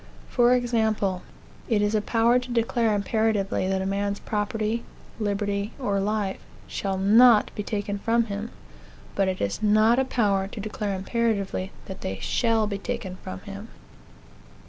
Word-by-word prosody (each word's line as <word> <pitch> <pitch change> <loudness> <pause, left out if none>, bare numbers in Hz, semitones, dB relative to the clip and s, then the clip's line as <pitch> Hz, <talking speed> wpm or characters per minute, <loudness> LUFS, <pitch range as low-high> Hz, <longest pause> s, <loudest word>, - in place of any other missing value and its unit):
For 245 0 +4
example, 220 -6 0 0.5
it 220 -3 +3
is 205 +1 +1
a 215 - +2
power 230 +3 +3
to 250 0 -9
declare 230 -2 +1
imperatively 205 -2 0
that 190 0 0
a - - -3
man's 200 +1 -1
property, 215 +1 -2 0.4
liberty, 205 0 -1
or 205 -8 0
life, 205 -1 -1 0.3
shall 195 -1 -2
not 215 +3 +6
be - - -4
taken 205 -1 -3
from 230 +3 +2
him; 210 0 -5 0.6
but 195 -1 +1
it 185 -1 -1
is 100 -1 -2
not 215 +3 +4
a - - +3
power 200 -7 +1
to 210 - -9
declare 210 -1 -3
imperatively 200 -2 -1
that 190 0 -8
they 95 - -3
shall 225 - +1
be 200 -1 -3
taken 220 -6 -4
from 185 0 -8
him. 200 +1 -8
210 Hz, 155 wpm, -25 LUFS, 195-230 Hz, 0.6 s, not